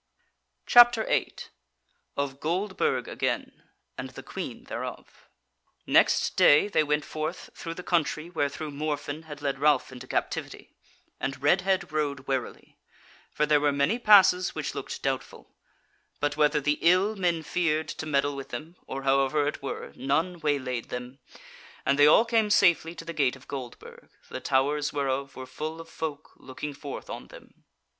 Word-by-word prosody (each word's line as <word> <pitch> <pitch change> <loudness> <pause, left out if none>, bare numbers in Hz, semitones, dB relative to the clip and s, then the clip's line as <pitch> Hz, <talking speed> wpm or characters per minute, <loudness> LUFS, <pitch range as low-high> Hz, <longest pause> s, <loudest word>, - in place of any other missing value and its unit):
CHAPTER 240 -2 +7
8 - - -2 0.7
Of 140 -1 -2
Goldburg 195 - -1
Again, - - -3 0.4
and - - -5
the - - -11
Queen - - -6
Thereof - - -8 0.6
Next - - +3
day 180 -2 +6
they 205 - +2
went 150 0 0
forth 155 +3 -5
through 165 0 -7
the 180 - -8
country 165 -2 0
wherethrough 155 -2 -3
Morfinn 150 +1 -4
had 150 -2 -10
led 135 -1 -1
Ralph 145 -3 +3
into 125 -1 -10
captivity; - - -4 0.5
and 135 -1 -3
Redhead 185 +6 +2
rode 145 -2 -1
warily; 130 -1 -5 0.5
for 150 - +1
there 150 0 +4
were 145 0 +3
many 140 +12 +1
passes 190 -5 +6
which - - -3
looked - - -6
doubtful: - - -4 0.7
but 145 0 0
whether 150 0 +3
the 150 +1 0
ill 185 +5 +4
men 175 -4 0
feared 155 -1 0
to 155 - -5
meddle 145 -1 +1
with 135 -1 -7
them, 165 +4 -7
or 135 0 -5
however 135 +2 +2
it 150 - -3
were, 135 - -6
none 160 +7 -1
waylaid 130 -6 -2
them, 125 +2 -7 0.7
and 140 +1 +2
they 145 - +8
all 220 +9 +6
came 225 -2 +2
safely 170 -4 +3
to 165 - -9
the 170 - -5
gate 140 -4 +1
of 130 - -17
Goldburg, 130 -4 -9 0.2
the - - -5
towers 145 +3 +1
whereof 140 -1 -2
were 130 - -7
full 155 +5 -6
of 165 - -9
folk 155 -2 -6
looking 135 +3 -7
forth 140 0 -8
on - - -7
them. - - -16
150 Hz, 160 wpm, -27 LUFS, 140-170 Hz, 0.7 s, they